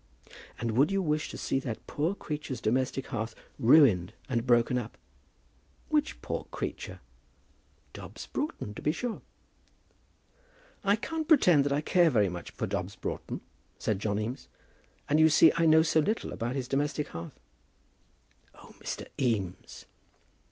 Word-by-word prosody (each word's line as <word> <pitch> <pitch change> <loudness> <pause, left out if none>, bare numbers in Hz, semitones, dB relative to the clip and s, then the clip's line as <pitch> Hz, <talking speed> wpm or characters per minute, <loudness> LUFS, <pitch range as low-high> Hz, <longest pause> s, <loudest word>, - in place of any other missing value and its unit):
"And 115 -1 -1
would 135 - +3
you 195 - +1
wish 155 -4 0
to - - -7
see 135 - 0
that 120 -4 -6
poor 160 +7 -1
creature's 150 - -5
domestic 130 +4 0
hearth 115 -3 -3 0.2
ruined 115 - +5
and 125 -2 -1
broken 120 +1 +4
up?" 115 -2 -8 0.9
"Which 300 -1 0
poor - - -3
creature?" - - -5 0.9
"Dobbs - - -9
Broughton, 290 - -4
to - - -8
be 150 - +2
sure." 235 +7 -4 1.6
"I 200 0 +4
can't 315 +7 -4
pretend 180 - +5
that 145 - 0
I 145 +1 +1
care 175 +2 +4
very 105 -8 +3
much 90 -1 -7
for - - -4
Dobbs - - -3
Broughton," - - -5 0.4
said 105 -3 -1
John 105 0 -1
Eames; 110 +5 -4 0.6
"and 150 +2 +3
you 160 0 +7
see 155 +1 +7
I 165 -1 +3
know 160 0 +7
so 160 0 +3
little 210 +9 -1
about 120 +3 -3
his 130 -2 -3
domestic 145 +2 -1
hearth." 85 0 -8 1.2
"Oh, - - -15
Mr. - - -5
Eames!" 100 -8 -2
140 Hz, 150 wpm, -29 LUFS, 115-160 Hz, 1.6 s, you